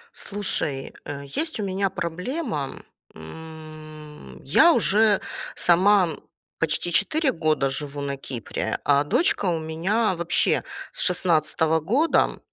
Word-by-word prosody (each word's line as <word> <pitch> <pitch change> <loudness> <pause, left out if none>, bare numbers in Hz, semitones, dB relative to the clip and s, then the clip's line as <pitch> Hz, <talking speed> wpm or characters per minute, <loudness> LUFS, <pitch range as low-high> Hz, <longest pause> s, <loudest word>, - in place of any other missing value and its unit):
Слушай, 160 -9 -1
э, 140 -1 -6
есть 310 - -3
у - - -2
меня 195 0 -1
проблема, 180 - -4 0.5
м. 155 - -11
Я 315 - +5
уже 210 -4 +3 0.4
сама, 185 +1 +4 0.5
почти 165 +2 0
4 305 - +2
года 155 - 0
живу 145 +1 -5
на 140 0 -3
Кипре, 125 -5 -4
а 145 0 +3
дочка 270 - +1
у 170 -2 0
меня 180 +7 -1
вообще 170 0 +1 0.3
с - - -9
16 160 -2 +2
года. 255 - +1
160 Hz, 115 wpm, -24 LUFS, 150-200 Hz, 0.5 s, Я